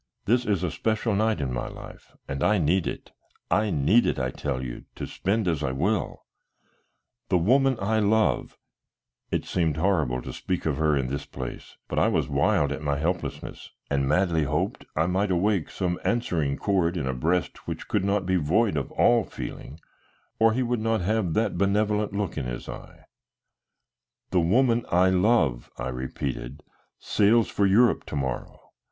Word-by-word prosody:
This 120 +3 +2
is 100 -4 +1
a 90 - -1
special 110 +5 -1
night 110 -1 +1
in 65 -3 -2
my - - -3
life, - - -11
and 70 0 -3
I 105 0 +4
need 85 +2 +1
it, - - -6 0.4
I 105 0 +2
need 85 +8 +3
it, - - 0
I 65 -1 -1
tell 70 -1 -3
you, - - -7
to - - -5
spend 100 +1 -1
as 80 -4 0
I 65 -3 -1
will. 95 +10 -1 1.0
The 90 - +4
woman 130 +8 +3
I 110 +3 +1
love" 105 - +1 0.7
it - - -1
seemed 80 -4 0
horrible 80 -9 +1
to - - -7
speak 90 -1 -3
of 75 -4 0
her 75 -2 +2
in 65 - 0
this 70 +2 -4
place, 65 -3 -8
but - - -1
I - - +4
was - - +1
wild 70 -1 +2
at 70 +1 -4
my 70 -1 0
helplessness, 85 +4 -4 0.2
and 70 -1 +1
madly 85 0 +2
hoped 75 +2 -2
I 80 - +2
might 95 +3 0
awake 95 0 +1
some 90 -2 -2
answering 85 -12 0
chord 95 -3 +1
in 75 - -2
a 65 - -1
breast 80 +7 -1
which - - -5
could - - 0
not 100 -1 0
be 95 0 +2
void 90 +5 +2
of 70 - -3
all 120 -2 +4
feeling 75 -4 -8 0.6
or 110 0 +5
he 130 +3 0
would 120 -2 -1
not 115 -2 +1
have 95 -3 0
that 105 -6 0
benevolent 105 +1 +1
look 100 -6 -2
in 65 - -4
his - - -5
eye - - -10 1.3
"the 90 - +3
woman 115 +7 +3
I 90 +2 +4
love," 90 - +2
I 60 - -3
repeated, 65 +1 -5 0.3
"sails 110 +2 +3
for 100 - +2
Europe 110 +4 +4
to - - -5
morrow. 65 -3 -3
90 Hz, 180 wpm, -26 LUFS, 75-105 Hz, 1.3 s, or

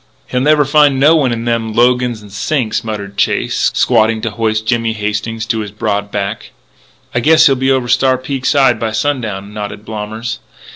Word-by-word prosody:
"He'll 125 - -2
never 150 +1 +3
find 145 -2 +3
no 150 +4 +5
one 140 -6 +2
in 115 0 -3
them 115 -2 -1
logans 120 -1 +1
an' 100 - -14
sinks," 110 +3 -1
muttered 100 -3 -6
Chase, - - +1
squatting 110 +1 +2
to 115 - -3
hoist 110 0 -1
Jimmy 115 0 0
Hastings 105 +1 -3
to 115 0 -1
his 105 -1 -4
broad 105 -1 -2
back. 100 -1 -4 0.6
"I 120 - +1
guess 160 +5 +5
he'll 140 - +5
be 130 0 0
over 130 -2 +1
Star 130 +1 +2
Peak 130 0 -4
side 135 -3 +3
by 110 -1 -2
sundown," 110 -7 -2
nodded 105 0 -6
Blommers. 110 +2 -5
115 Hz, 185 wpm, -15 LUFS, 105-130 Hz, 0.6 s, no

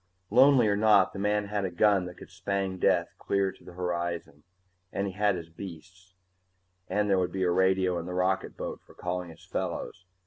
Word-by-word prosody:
Lonely 130 0 +6
or 100 - +2
not, 105 -2 +4
the 95 - -6
man 105 +1 +1
had 105 -1 -1
a 95 - -1
gun 95 +1 +3
that 90 - -10
could - - -12
spang 95 0 -2
death - - +2
clear 100 -1 0
to - - -20
the 90 - -12
horizon, 85 -4 -3 0.5
and 100 - -1
he 95 - -4
had 105 0 +2
his 85 -2 -7
beasts, 95 +2 -11 0.7
and 105 0 0
there 95 -2 +3
would 90 - 0
be 95 -1 -1
a 90 - +2
radio 95 0 +2
in 85 - -6
the 90 - -4
rocketboat 95 +1 -1
for - - -19
calling 90 0 -3
his 80 - -14
fellows. 90 0 -4
95 Hz, 200 wpm, -28 LUFS, 90-100 Hz, 0.7 s, Lonely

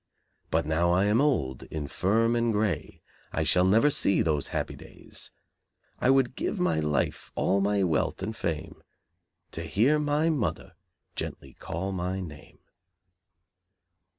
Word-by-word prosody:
But 80 0 +1
now 80 +3 +2
I 90 +2 +3
am 105 +5 +3
old, 70 - +1
infirm 100 - +1
and 115 0 +2
grey 105 -7 -2 0.3
I 80 - 0
shall 90 +3 +3
never 110 +10 +5
see 125 -8 +2
those 75 -4 0
happy - - -3
days; - - -10 0.7
I 125 - +2
would 135 -1 +3
give 205 - -2
my 180 - +2
life, 75 -4 -1
all 100 +1 +2
my 100 0 +2
wealth, 85 +2 0
and 110 +3 -3
fame 80 -7 -4 0.7
To - - -5
hear 135 +9 +2
my 150 +2 +2
mother 110 - -2 0.4
gently 65 -2 -6
call 95 +4 -4
my 95 0 -2
name." 75 -5 -9
95 Hz, 140 wpm, -28 LUFS, 80-115 Hz, 0.7 s, never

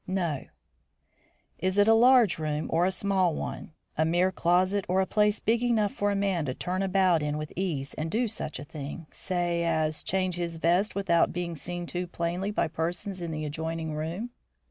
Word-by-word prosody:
"No." 175 -7 -1 1.1
"Is 185 +1 0
it 205 +1 +5
a 225 - +7
large 240 -5 +5
room 155 -1 -2
or 170 +2 +3
a - - +1
small 190 -3 +1
one; - - -5 0.2
a 155 - +2
mere 175 +3 +2
closet 185 +3 +2
or 185 +1 +3
a 190 - +3
place 210 +1 +2
big 230 +1 +1
enough 225 -4 +2
for 205 - 0
a 200 - 0
man 195 -5 0
to 130 -2 -3
turn 185 +1 -2
about 190 -3 +3
in 150 0 -1
with 150 0 -6
ease 160 -7 -2
and 155 +1 -3
do 230 +7 +1
such 205 -7 -4
a - - -7
thing, 150 +3 -7
say, 175 -2 -1
as 155 -2 0
change 185 -2 -1
his 170 -1 -3
vest 175 +6 +2
without 175 -4 +2
being 175 -1 -3
seen 175 +3 -5
too 180 +1 -4
plainly 175 +3 -2
by 210 - 0
persons 175 +4 -3
in 170 - -3
the 155 -1 -3
adjoining 160 +1 -3
room?" 165 +10 -4
175 Hz, 195 wpm, -28 LUFS, 160-195 Hz, 1.1 s, a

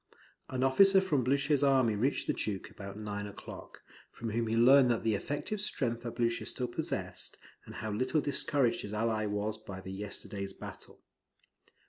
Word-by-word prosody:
An 130 0 -1
officer 195 +9 +6
from 155 -9 +1
Blucher's 140 +3 +2
army 130 -6 +4
reached 130 +7 0
the - - +1
Duke 100 -3 -3
about 100 0 -8
nine 105 -1 -4
o'clock, 100 - -10 0.3
from 115 -1 -6
whom 115 +1 0
he 110 - 0
learned 125 0 +6
the 110 - +2
effective 145 - -3
strength 120 - 0
that 120 -1 -6
Blucher 115 -1 0
still 125 - -1
possessed, 120 - -4 0.3
and - - -9
how 110 0 -4
little 130 +8 +1
discouraged 145 -3 +1
his 105 - -6
ally 110 0 0
was 105 +1 -2
by 95 -3 -8
the 95 0 -8
yesterday's 100 0 -4
battle. - - -10
115 Hz, 165 wpm, -32 LUFS, 105-135 Hz, 0.3 s, officer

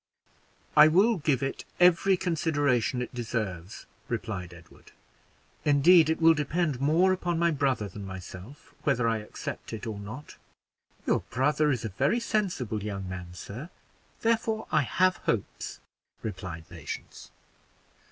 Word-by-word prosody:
"I 150 +1 +9
will 195 +8 +4
give 145 -5 +1
it 135 - -3 0.2
every 180 +2 +5
consideration 145 -8 +1
it - - -9
deserves," 105 -6 -4 0.2
replied 100 -6 -4
Edward. 85 -1 -16 0.7
"Indeed, 155 +3 +6
it 160 - +1
will 165 0 +7
depend 150 -2 -1
more 170 +6 +4
upon 175 -2 -1
my 170 0 +3
brother 135 -7 0
than 100 +2 -9
myself 95 +6 -10
whether 125 -5 +1
I 115 -1 +1
accept 105 +2 -7
it 110 +1 -5
or 110 -3 -4
not." 120 +9 -9 0.7
"Your - - +2
brother 150 +4 +2
is 125 -3 -2
a - - -2
very 135 - +1
sensible 185 - -1
young 100 -2 -4
man, 90 -1 -7
sir; 120 - -8 0.5
therefore, 225 -1 +1
I - - +4
have 185 +7 +2
hopes," 110 -4 -3 0.4
replied 90 -6 -6
Patience. 85 -4 -8
135 Hz, 135 wpm, -28 LUFS, 105-165 Hz, 0.7 s, I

